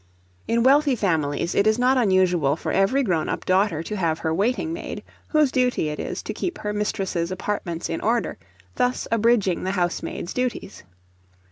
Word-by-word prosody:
In 230 Hz, 0 st, +2 dB
wealthy 280 Hz, +1 st, +4 dB
families 165 Hz, -5 st, 0 dB
it 200 Hz, -, +3 dB
is 215 Hz, +1 st, +3 dB
not 250 Hz, +2 st, +3 dB
unusual 185 Hz, -, +3 dB
for -, -, -4 dB
every 205 Hz, +9 st, +2 dB
grown 170 Hz, -9 st, 0 dB
up -, -, -3 dB
daughter 185 Hz, -4 st, +2 dB
to 210 Hz, -, -5 dB
have 165 Hz, -5 st, 0 dB
her 160 Hz, -1 st, -2 dB
waiting 245 Hz, -, 0 dB
maid, 335 Hz, -, -6 dB, 0.2 s
whose 305 Hz, -4 st, +3 dB
duty 250 Hz, -, +1 dB
it 150 Hz, -, -5 dB
is -, -, -4 dB
to -, -, -4 dB
keep 360 Hz, 0 st, -3 dB
her 210 Hz, 0 st, -3 dB
mistress's 195 Hz, -4 st, -2 dB
apartments 185 Hz, -3 st, -3 dB
in 165 Hz, -, -3 dB
order, 230 Hz, +2 st, 0 dB, 0.4 s
thus 250 Hz, 0 st, 0 dB
abridging 225 Hz, -5 st, +2 dB
the 185 Hz, -, -1 dB
housemaid's 175 Hz, -1 st, -2 dB
duties. 250 Hz, -5 st, -3 dB
200 Hz, 170 wpm, -23 LUFS, 175-245 Hz, 0.4 s, wealthy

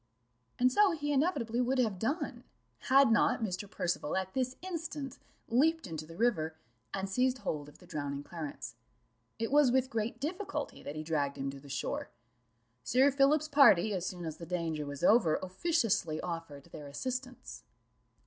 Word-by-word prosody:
And 250 Hz, +1 st, +4 dB
so 400 Hz, +6 st, +5 dB
he 290 Hz, -2 st, -1 dB
inevitably 265 Hz, -6 st, +1 dB
would 255 Hz, +2 st, +1 dB
have 220 Hz, -7 st, +1 dB
done, 270 Hz, -, -2 dB, 0.5 s
had 270 Hz, -2 st, +6 dB
not 225 Hz, 0 st, +3 dB
Mr. 195 Hz, -1 st, -3 dB
Percival 175 Hz, -4 st, -1 dB
at 190 Hz, 0 st, -3 dB
this 255 Hz, -1 st, -1 dB
instant 320 Hz, -7 st, -5 dB, 0.3 s
leaped 315 Hz, +8 st, +2 dB
into 160 Hz, -4 st, -6 dB
the 165 Hz, -, -11 dB
river, 175 Hz, -9 st, +1 dB, 0.4 s
and 195 Hz, 0 st, -2 dB
seized 250 Hz, +6 st, +1 dB
hold 150 Hz, -, -4 dB
of 150 Hz, -, -17 dB
the 180 Hz, -, -17 dB
drowning 145 Hz, -4 st, -4 dB
Clarence. 150 Hz, -8 st, -6 dB, 0.6 s
It 225 Hz, +2 st, -2 dB
was 290 Hz, -3 st, +5 dB
with 260 Hz, +1 st, +2 dB
great 230 Hz, +1 st, -2 dB
difficulty 340 Hz, +2 st, -4 dB
that 145 Hz, -, -7 dB
he 155 Hz, -, -4 dB
dragged 145 Hz, -3 st, -1 dB
him 135 Hz, 0 st, -2 dB
to 135 Hz, -, -10 dB
the 140 Hz, +1 st, -14 dB
shore. 135 Hz, -, -3 dB, 0.7 s
Sir 265 Hz, +3 st, +4 dB
Philip's 280 Hz, +3 st, +3 dB
party, 245 Hz, -, +6 dB
as 185 Hz, -3 st, -2 dB
soon 180 Hz, -1 st, -4 dB
as 160 Hz, -1 st, -5 dB
the 170 Hz, -, -9 dB
danger 165 Hz, -4 st, -2 dB
was 145 Hz, +2 st, -6 dB
over, 190 Hz, -5 st, +5 dB
officiously 190 Hz, -, 0 dB
offered 165 Hz, -5 st, -5 dB
their 145 Hz, -, -8 dB
assistance. 255 Hz, -, -5 dB
220 Hz, 170 wpm, -32 LUFS, 160-270 Hz, 0.7 s, had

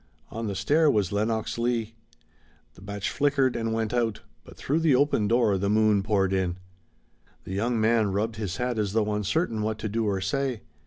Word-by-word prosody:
On 115 Hz, 0 st, -4 dB
the 100 Hz, -, -3 dB
stair 155 Hz, +8 st, +3 dB
was 105 Hz, -8 st, +1 dB
Lenox 110 Hz, +2 st, -1 dB
Leigh. 115 Hz, -2 st, -1 dB, 0.8 s
The 85 Hz, -, -17 dB
match 100 Hz, 0 st, -4 dB
flickered 140 Hz, -2 st, +1 dB
and 115 Hz, -1 st, -2 dB
went 110 Hz, 0 st, -1 dB
out, 115 Hz, -3 st, 0 dB, 0.2 s
but -, -, -15 dB
through 150 Hz, +4 st, 0 dB
the 160 Hz, -5 st, +3 dB
open 130 Hz, -6 st, +2 dB
door 110 Hz, -4 st, +2 dB
the 100 Hz, +1 st, 0 dB
moon 105 Hz, -1 st, +3 dB
poured 95 Hz, -2 st, +1 dB
in. 90 Hz, -2 st, 0 dB, 0.9 s
The 95 Hz, -, -7 dB
young 115 Hz, +4 st, 0 dB
man 110 Hz, -2 st, +2 dB
rubbed 110 Hz, +3 st, -2 dB
his 100 Hz, -4 st, -4 dB
hat 125 Hz, -2 st, -1 dB
as 100 Hz, -2 st, -1 dB
though 105 Hz, -1 st, +1 dB
uncertain 105 Hz, -, -1 dB
what 110 Hz, 0 st, -2 dB
to 110 Hz, -, -4 dB
do 110 Hz, +2 st, -1 dB
or 100 Hz, -2 st, 0 dB
say. 125 Hz, +4 st, -2 dB
110 Hz, 195 wpm, -26 LUFS, 100-120 Hz, 0.9 s, stair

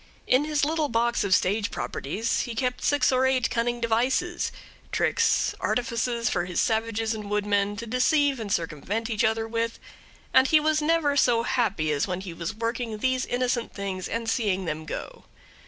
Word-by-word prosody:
In 260 Hz, +4 st, +3 dB
his 300 Hz, -1 st, +1 dB
little 310 Hz, -1 st, 0 dB
box 235 Hz, +1 st, +1 dB
of 190 Hz, -2 st, +4 dB
stage 205 Hz, +3 st, +1 dB
properties 215 Hz, +12 st, -2 dB
he 235 Hz, -, -3 dB
kept 250 Hz, +1 st, -2 dB
six 290 Hz, -3 st, +3 dB
or 260 Hz, 0 st, +3 dB
eight 260 Hz, -2 st, +1 dB
cunning 240 Hz, +1 st, 0 dB
devices, 255 Hz, +10 st, 0 dB, 0.4 s
tricks, 460 Hz, -1 st, +2 dB
artifices 235 Hz, -1 st, -1 dB
for 175 Hz, -4 st, 0 dB
his 180 Hz, -1 st, -2 dB
savages 225 Hz, 0 st, 0 dB
and 210 Hz, -2 st, -6 dB
woodsmen 205 Hz, 0 st, +1 dB
to 230 Hz, +3 st, -6 dB
deceive 270 Hz, +3 st, +2 dB
and 215 Hz, -3 st, -5 dB
circumvent 195 Hz, +8 st, -2 dB
each 215 Hz, -, 0 dB
other 225 Hz, 0 st, +1 dB
with, 230 Hz, 0 st, -2 dB, 0.6 s
and 260 Hz, -, +6 dB
he 310 Hz, +3 st, +5 dB
was 310 Hz, 0 st, +1 dB
never 300 Hz, -2 st, +2 dB
so 240 Hz, -4 st, +3 dB
happy 210 Hz, -12 st, 0 dB
as 145 Hz, +3 st, 0 dB
when 180 Hz, 0 st, -3 dB
he 185 Hz, -3 st, -7 dB
was 170 Hz, +5 st, -5 dB
working 230 Hz, 0 st, -3 dB
these 255 Hz, +3 st, 0 dB
innocent 245 Hz, -1 st, -1 dB
things 195 Hz, -2 st, -4 dB
and 230 Hz, 0 st, -3 dB
seeing 205 Hz, -5 st, 0 dB
them 155 Hz, -1 st, -4 dB
go. -, -, -7 dB
230 Hz, 175 wpm, -26 LUFS, 205-255 Hz, 0.6 s, and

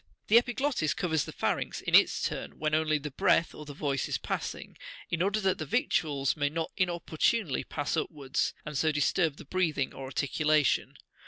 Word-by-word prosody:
59 -, -, -44 dB
The 225 Hz, -, +8 dB
epiglottis 245 Hz, -, -1 dB
covers 160 Hz, -5 st, 0 dB
the -, -, -7 dB
pharynx, -, -, -2 dB
in -, -, -5 dB
its -, -, +5 dB
turn, -, -, -6 dB
when 155 Hz, -1 st, -1 dB
only 155 Hz, 0 st, +2 dB
the 150 Hz, 0 st, -6 dB
breath 165 Hz, +4 st, +2 dB
or 150 Hz, -, -9 dB
the 145 Hz, -, -8 dB
voice 140 Hz, -2 st, -1 dB
is -, -, 0 dB
passing, -, -, -5 dB, 0.4 s
in 170 Hz, -1 st, 0 dB
order 200 Hz, +3 st, +1 dB
that 190 Hz, -2 st, +1 dB
the 155 Hz, -, -3 dB
victuals 140 Hz, -1 st, +1 dB
may 145 Hz, -2 st, 0 dB
not 165 Hz, +2 st, -3 dB
inopportunely 175 Hz, -, 0 dB
pass 145 Hz, -1 st, -3 dB
upwards, 140 Hz, -4 st, -2 dB
and 150 Hz, -, -6 dB
so 155 Hz, +3 st, +2 dB
disturb 150 Hz, +1 st, +1 dB
the 170 Hz, -, -11 dB
breathing 155 Hz, -4 st, 0 dB
or 135 Hz, -, -7 dB
articulation. 150 Hz, +1 st, +1 dB
155 Hz, 185 wpm, -29 LUFS, 145-175 Hz, 0.4 s, The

